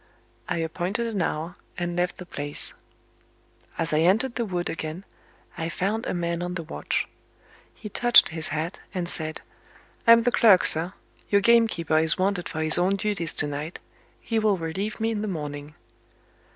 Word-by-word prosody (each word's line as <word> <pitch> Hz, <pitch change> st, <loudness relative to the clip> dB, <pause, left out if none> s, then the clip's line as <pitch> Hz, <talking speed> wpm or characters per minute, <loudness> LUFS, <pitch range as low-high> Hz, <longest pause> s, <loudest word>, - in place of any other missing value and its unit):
I -, -, -1 dB
appointed 175 Hz, +7 st, -2 dB
an 220 Hz, -5 st, -2 dB
hour, 165 Hz, +2 st, -3 dB, 0.2 s
and 175 Hz, -1 st, -3 dB
left 175 Hz, 0 st, -1 dB
the 180 Hz, -, -9 dB
place. 145 Hz, -4 st, -3 dB, 1.0 s
As 165 Hz, -, -1 dB
I 150 Hz, -, +3 dB
entered 210 Hz, +10 st, +2 dB
the 235 Hz, -, -2 dB
wood 180 Hz, -3 st, -2 dB
again, 160 Hz, +3 st, -5 dB, 0.5 s
I 165 Hz, 0 st, -2 dB
found 210 Hz, +7 st, -2 dB
a -, -, -1 dB
man 170 Hz, 0 st, -2 dB
on 180 Hz, 0 st, -4 dB
the 170 Hz, -, -4 dB
watch. 160 Hz, -, -3 dB, 0.7 s
He 215 Hz, -, -9 dB
touched 240 Hz, +3 st, +5 dB
his 160 Hz, -1 st, -3 dB
hat, 160 Hz, +4 st, -3 dB, 0.2 s
and 175 Hz, -2 st, -2 dB
said: 155 Hz, -2 st, -3 dB, 0.7 s
"I'm 230 Hz, 0 st, +8 dB
the 245 Hz, -, +2 dB
clerk, 210 Hz, -6 st, +5 dB
sir. 165 Hz, +4 st, +5 dB, 0.4 s
Your 200 Hz, -1 st, +4 dB
gamekeeper 210 Hz, -8 st, +3 dB
is 160 Hz, 0 st, +3 dB
wanted 185 Hz, -1 st, 0 dB
for 155 Hz, -, -4 dB
his 155 Hz, +2 st, +5 dB
own 185 Hz, +3 st, +2 dB
duties 195 Hz, -5 st, -2 dB
to -, -, +3 dB
night; 145 Hz, +3 st, -5 dB, 0.4 s
he 225 Hz, -1 st, -1 dB
will 215 Hz, -3 st, +2 dB
relieve 190 Hz, +7 st, -4 dB
me 225 Hz, +1 st, 0 dB
in 210 Hz, -2 st, -2 dB
the 215 Hz, -, -3 dB
morning." 150 Hz, -4 st, -6 dB
175 Hz, 175 wpm, -25 LUFS, 160-205 Hz, 1.0 s, I'm